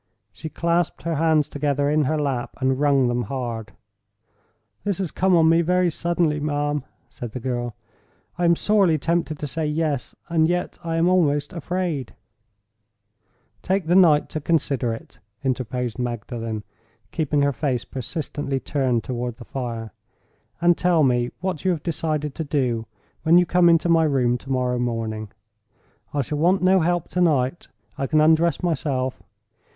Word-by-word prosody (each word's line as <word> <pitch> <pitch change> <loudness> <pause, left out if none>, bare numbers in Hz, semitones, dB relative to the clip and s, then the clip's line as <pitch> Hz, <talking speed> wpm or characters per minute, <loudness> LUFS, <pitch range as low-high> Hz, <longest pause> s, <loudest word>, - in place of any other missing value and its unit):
She 155 - -8
clasped 170 +1 -1
her 170 - -1
hands 160 -2 +3
together 145 -1 0
in 150 0 +2
her 155 +3 0
lap, 135 -5 -2
and 130 0 0
wrung 140 -3 +3
them 120 0 -1
hard. 115 -6 -5 1.1
"This 200 -4 -1
has 190 -5 -3
come 185 -1 +2
on 165 -1 +5
me 165 +1 +5
very 180 +1 +2
suddenly, 170 -2 0
ma'am," 145 -1 -1 0.2
said 120 -2 -8
the 125 - -4
girl. 120 -1 -3 0.6
"I 175 - 0
am 170 0 +5
sorely 195 -5 +3
tempted 165 0 -1
to 150 - -5
say 155 +2 -2
Yes; 150 -3 -2
and 160 -2 +2
yet 175 +1 -2
I 165 -1 -2
am 165 +1 +3
almost 150 -6 +2
afraid—" 170 -6 -3 1.5
"Take 190 -1 0
the 170 - +1
night 165 -6 +5
to 155 - -4
consider 140 -6 0
it," 115 - -9 0.2
interposed 125 -2 -2
Magdalen, 115 -2 -4 0.5
keeping 150 -3 0
her 140 0 +2
face 130 -2 -1
persistently 135 +1 -4
turned 130 -5 0
toward 120 -2 -3
the 120 -1 -12
fire; 115 -5 -5 0.7
"and 175 +1 +4
tell 175 -3 +3
me 120 -2 +2
what 185 -5 -3
you 190 - +2
have 170 -5 -1
decided 155 -3 -2
to 160 - -4
do, 125 -6 -1 0.3
when 165 +2 +5
you 180 - +5
come 175 0 +4
into 165 0 +4
my 165 -1 +4
room 125 -4 +1
to 135 - -14
morrow 125 -2 0
morning. 115 -3 -3 0.8
I 145 - 0
shall 150 +3 -4
want 180 +4 +3
no 190 +1 +5
help 175 0 0
to 180 - -1
night—I 130 -6 -1
can 155 +2 +2
undress 160 +2 +3
myself. 135 -6 -1
150 Hz, 160 wpm, -23 LUFS, 125-170 Hz, 1.5 s, on